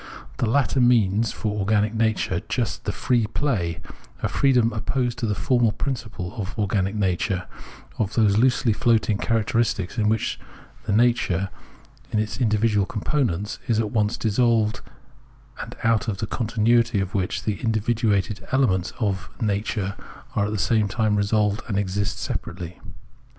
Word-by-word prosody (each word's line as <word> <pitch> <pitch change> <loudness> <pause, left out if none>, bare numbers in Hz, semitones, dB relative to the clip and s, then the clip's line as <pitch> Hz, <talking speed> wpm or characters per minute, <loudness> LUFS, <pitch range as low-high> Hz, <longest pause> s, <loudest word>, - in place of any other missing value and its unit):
The 120 - 0
latter 135 +1 +2
means 115 -3 +3
for 105 -1 -3
organic 105 +2 +1
nature 110 -2 0
just - - -2
the - - 0
free 120 -4 +1
play 100 - -1 0.2
— - - -24
a - - +3
freedom 125 -4 +3
opposed 120 +1 -1
to 115 - -1
the 105 - 0
formal 120 -3 +2
principle 110 -8 -4
of 100 +4 -6
organic 100 -1 0
nature 95 -1 0 0.3
— - - -20
of 105 0 -1
those 105 -3 +4
loosely 125 -2 +3
floating 110 -2 +2
characteristics 115 -2 0
in 105 -1 +3
which 110 0 0 0.5
nature, 100 -4 +2 0.6
in - - 0
its 110 +4 -2
individual 105 -3 +2
components, 105 - -1
is 115 -2 +2
at 110 -2 -1
once 105 0 +1
dissolved 110 -1 +2 0.8
and - - -7
out 115 0 +2
of 105 -3 -1
the 110 - -2
continuity 115 0 +2
of 95 +1 -3
which 95 -3 -1
the 105 -3 -1
individuated 110 -2 0
elements 95 -10 +1
of 95 -6 -1
nature 105 -2 -1 0.4
are 100 - +2
at - - -4
the 110 - -1
same 110 0 +2
time 110 +1 +1
resolved 105 +1 +1
and 105 -5 -1
exist 100 0 -1
separately. 90 0 -5
110 Hz, 150 wpm, -24 LUFS, 100-115 Hz, 0.8 s, those